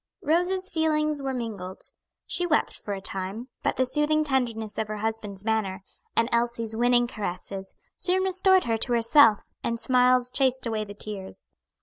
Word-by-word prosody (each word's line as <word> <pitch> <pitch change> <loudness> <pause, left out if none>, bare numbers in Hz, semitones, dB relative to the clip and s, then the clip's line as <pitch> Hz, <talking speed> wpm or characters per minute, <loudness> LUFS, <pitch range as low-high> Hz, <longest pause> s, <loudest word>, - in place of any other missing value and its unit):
Rose's 360 +4 +1
feelings 305 -2 +1
were 270 -1 -2
mingled. 215 -7 -5 0.4
She 355 - +1
wept 310 -3 +1
for 205 - -4
a 195 - -7
time, 195 +6 -4
but - - 0
the 260 - +2
soothing 300 +3 +2
tenderness 235 -7 -1
of 220 - -1
her 215 0 -4
husband's 210 -2 -4
manner, 200 -4 -1 0.3
and 230 - +3
Elsie's 235 -1 0
winning 240 +1 +3
caresses, 195 -3 -6 0.2
soon 370 +1 +1
restored 380 0 +4
her 230 -1 0
to 240 +2 0
herself, 230 -1 +5 0.2
and 230 0 -1
smiles 250 0 +3
chased 260 -1 +1
away 220 -2 -2
the 205 0 -10
tears. 205 -2 -8
235 Hz, 160 wpm, -26 LUFS, 215-290 Hz, 0.4 s, herself